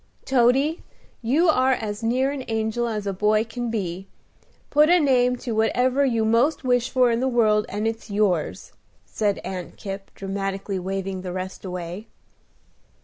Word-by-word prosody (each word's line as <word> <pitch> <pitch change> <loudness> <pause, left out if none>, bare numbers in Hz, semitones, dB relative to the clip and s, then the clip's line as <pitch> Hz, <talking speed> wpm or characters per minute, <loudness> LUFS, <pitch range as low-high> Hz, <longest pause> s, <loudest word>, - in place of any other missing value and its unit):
"Toady, 270 +5 +3 0.4
you 280 +10 +2
are 260 -4 +4
as 210 -3 -4
near 255 +4 +1
an 280 -2 -5
angel 225 +1 -1
as 215 -3 -3
a 200 - -1
boy 210 +3 +2
can 235 +1 -5
be. 190 -4 -3 0.6
Put 300 +2 +5
a 355 +1 +6
name 250 -4 +3
to 245 -1 -6
whatever 245 +5 +2
you 230 -5 +1
most 235 +9 +2
wish 245 -1 +1
for 250 -2 +3
in 230 - +1
the 260 - +1
world, 215 -4 +2
and 210 +2 -2
it's 225 0 -4
yours," 200 -6 0 0.3
said 205 -2 -1
Aunt 185 -2 -6
Kipp, 195 -1 -7
dramatically 195 0 -3
waving 190 0 -3
the 180 -1 -5
rest 185 0 -6
away. 180 +2 -6
225 Hz, 160 wpm, -24 LUFS, 195-250 Hz, 0.6 s, a